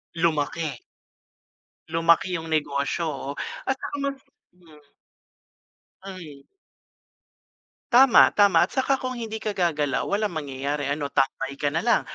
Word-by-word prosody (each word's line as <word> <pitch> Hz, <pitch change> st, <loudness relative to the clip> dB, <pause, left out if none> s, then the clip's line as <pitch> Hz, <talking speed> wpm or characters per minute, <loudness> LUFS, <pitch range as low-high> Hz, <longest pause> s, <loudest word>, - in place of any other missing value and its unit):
Lumaki. 155 Hz, -4 st, -1 dB, 1.1 s
Lumaki 165 Hz, +2 st, +2 dB
yung 160 Hz, -1 st, -6 dB
negosyo, 145 Hz, +1 st, -1 dB
oh. 140 Hz, -2 st, -4 dB, 0.3 s
At 265 Hz, 0 st, -1 dB
saka -, -, -5 dB
mas 275 Hz, -1 st, -2 dB, 0.3 s
mm. 155 Hz, -5 st, -21 dB, 1.2 s
Mm. 165 Hz, -8 st, -10 dB, 1.5 s
Tama, 255 Hz, +1 st, +7 dB
tama. 205 Hz, -1 st, +5 dB
At -, -, +2 dB
saka 265 Hz, 0 st, 0 dB
kung 255 Hz, -1 st, -4 dB
hindi 220 Hz, -2 st, -5 dB
ka 215 Hz, -, -2 dB
gagalaw, 155 Hz, -7 st, 0 dB
walang 210 Hz, +1 st, 0 dB
mangyayari. 140 Hz, 0 st, -3 dB
Ano, 145 Hz, 0 st, -2 dB
tambay 135 Hz, 0 st, -1 dB
ka 145 Hz, 0 st, -1 dB
na 165 Hz, -, 0 dB
lang. 235 Hz, 0 st, +3 dB
165 Hz, 125 wpm, -24 LUFS, 145-205 Hz, 1.5 s, Tama